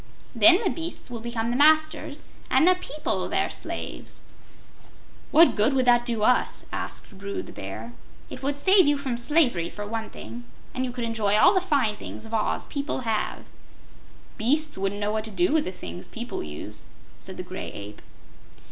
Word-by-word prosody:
Then 350 Hz, +5 st, +7 dB
the 380 Hz, -, +1 dB
beasts 330 Hz, -6 st, -5 dB
will 235 Hz, -, -4 dB
become 235 Hz, 0 st, -2 dB
the -, -, -1 dB
masters 310 Hz, +1 st, +3 dB, 0.3 s
and 270 Hz, +6 st, +4 dB
the 365 Hz, -, +7 dB
people 305 Hz, -4 st, -3 dB
their -, -, 0 dB
slaves." -, -, -7 dB, 1.1 s
"What 330 Hz, +2 st, +6 dB
good 220 Hz, +6 st, +3 dB
would 260 Hz, -1 st, +2 dB
that 240 Hz, 0 st, +4 dB
do 230 Hz, -3 st, -1 dB
us?" 250 Hz, +3 st, +2 dB
asked 205 Hz, -, -5 dB
Bru 200 Hz, 0 st, -4 dB
the -, -, -11 dB
Bear. 110 Hz, +5 st, -7 dB, 0.3 s
"It -, -, -9 dB
would 280 Hz, +1 st, -1 dB
save 375 Hz, +2 st, +5 dB
you 290 Hz, 0 st, +3 dB
from 270 Hz, -3 st, -3 dB
slavery, 240 Hz, -, +2 dB
for 205 Hz, -, -7 dB
one 225 Hz, +1 st, -4 dB
thing, 120 Hz, +2 st, -9 dB, 0.3 s
and 255 Hz, -, -2 dB
you 250 Hz, -, -4 dB
could 245 Hz, -1 st, -5 dB
enjoy 215 Hz, -3 st, +1 dB
all 360 Hz, -, +7 dB
the 375 Hz, -, +3 dB
fine 275 Hz, -, +1 dB
things 220 Hz, -, -8 dB
of 225 Hz, -, -10 dB
Oz 220 Hz, -1 st, 0 dB
people 280 Hz, -2 st, -3 dB
have." 225 Hz, -3 st, -2 dB, 0.9 s
"Beasts 300 Hz, +7 st, +2 dB
wouldn't 195 Hz, +1 st, -2 dB
know 205 Hz, 0 st, 0 dB
what 215 Hz, 0 st, -2 dB
to -, -, -7 dB
do 350 Hz, -, +1 dB
with 315 Hz, -1 st, +3 dB
the -, -, -3 dB
things 90 Hz, -, -8 dB
people -, -, -5 dB
use," 75 Hz, 0 st, -6 dB, 0.3 s
said -, -, -10 dB
the -, -, -4 dB
Gray -, -, -6 dB
Ape. 100 Hz, +1 st, -9 dB
240 Hz, 185 wpm, -25 LUFS, 210-300 Hz, 1.1 s, Then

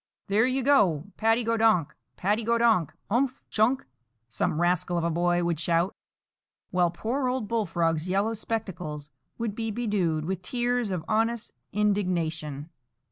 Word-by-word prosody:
"There 215 Hz, +5 st, +4 dB
you 260 Hz, 0 st, 0 dB
go, 200 Hz, -, +4 dB
Paddy 225 Hz, +2 st, +2 dB
go 230 Hz, 0 st, +1 dB
donk, 220 Hz, -9 st, +3 dB, 0.2 s
Paddy 210 Hz, +5 st, +1 dB
go 235 Hz, +1 st, +2 dB
donk—umph—chunk," 235 Hz, -, +1 dB, 0.4 s
some 135 Hz, +5 st, -1 dB
rascal 175 Hz, 0 st, +1 dB
of 170 Hz, -, 0 dB
a 170 Hz, -, +1 dB
boy 175 Hz, +1 st, +1 dB
would 170 Hz, -3 st, 0 dB
shout, 170 Hz, +2 st, +1 dB, 0.8 s
while 180 Hz, -2 st, +3 dB
poor 240 Hz, +10 st, -2 dB
old 250 Hz, -4 st, -1 dB
Bullfrog's 170 Hz, -6 st, 0 dB
yellow 200 Hz, +4 st, +1 dB
spectacles 180 Hz, -10 st, -4 dB, 0.3 s
would 230 Hz, -3 st, -2 dB
be 225 Hz, +1 st, -3 dB
bedewed 200 Hz, -9 st, 0 dB
with 185 Hz, +1 st, -3 dB
tears 245 Hz, +2 st, -1 dB
of 180 Hz, -4 st, -3 dB
honest 225 Hz, +1 st, 0 dB, 0.2 s
indignation. 170 Hz, -8 st, -1 dB
200 Hz, 135 wpm, -27 LUFS, 170-230 Hz, 0.8 s, There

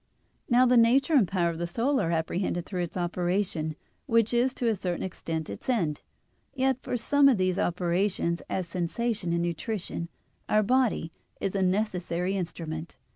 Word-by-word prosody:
Now 250 Hz, +1 st, +5 dB
the 250 Hz, 0 st, +5 dB
nature 250 Hz, +7 st, +4 dB
and 250 Hz, -10 st, +5 dB
power 170 Hz, -2 st, +1 dB
of 165 Hz, -, -7 dB
the 170 Hz, -, -1 dB
soul 245 Hz, +10 st, +1 dB
are 165 Hz, -, 0 dB
apprehended 170 Hz, +1 st, -1 dB
through 185 Hz, -3 st, -3 dB
its 175 Hz, +1 st, -4 dB
operation, 175 Hz, -2 st, -1 dB, 0.3 s
which 230 Hz, 0 st, +3 dB
is 245 Hz, +2 st, +3 dB
to 245 Hz, -, -1 dB
a 225 Hz, -, +3 dB
certain 180 Hz, -2 st, -3 dB
extent 165 Hz, -3 st, -4 dB
its -, -, -7 dB
end. 170 Hz, -, 0 dB, 0.5 s
Yet 265 Hz, -1 st, +1 dB
for 245 Hz, -, -2 dB
some 280 Hz, +4 st, +4 dB
of 250 Hz, -, +3 dB
these 185 Hz, 0 st, +1 dB
operations, 175 Hz, 0 st, 0 dB
as 185 Hz, -2 st, -2 dB
sensation 185 Hz, +3 st, -1 dB
and 170 Hz, 0 st, +1 dB
nutrition, 175 Hz, 0 st, -3 dB, 0.4 s
our 215 Hz, 0 st, +4 dB
body 240 Hz, -7 st, +1 dB, 0.3 s
is 195 Hz, -, -2 dB
a 195 Hz, -, 0 dB
necessary 185 Hz, -2 st, 0 dB
instrument. 165 Hz, -3 st, -5 dB
185 Hz, 170 wpm, -28 LUFS, 170-230 Hz, 0.5 s, Now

